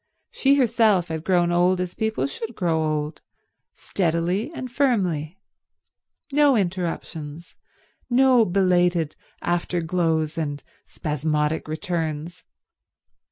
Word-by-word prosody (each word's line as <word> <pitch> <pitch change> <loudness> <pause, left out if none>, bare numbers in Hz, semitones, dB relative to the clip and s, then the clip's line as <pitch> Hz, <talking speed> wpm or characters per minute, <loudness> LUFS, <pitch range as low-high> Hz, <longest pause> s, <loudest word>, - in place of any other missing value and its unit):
She 275 +1 +3
herself 220 -9 +3
had 160 -1 -4
grown 175 -2 +2
old 180 +1 +3
as 180 -1 -3
people 220 -10 -1
should 220 +12 -5
grow 165 -5 0
old—steadily 165 - -3
and 255 -6 -7
firmly. 190 - 0 0.9
No 290 -1 +4
interruptions, 170 -4 -4 0.6
no 255 -1 +5
belated 180 -4 +2 0.3
after 175 0 0
glows 160 -2 0
and 145 -3 -3 0.2
spasmodic 150 +1 -1
returns. 160 -1 -4
175 Hz, 95 wpm, -23 LUFS, 160-200 Hz, 0.9 s, no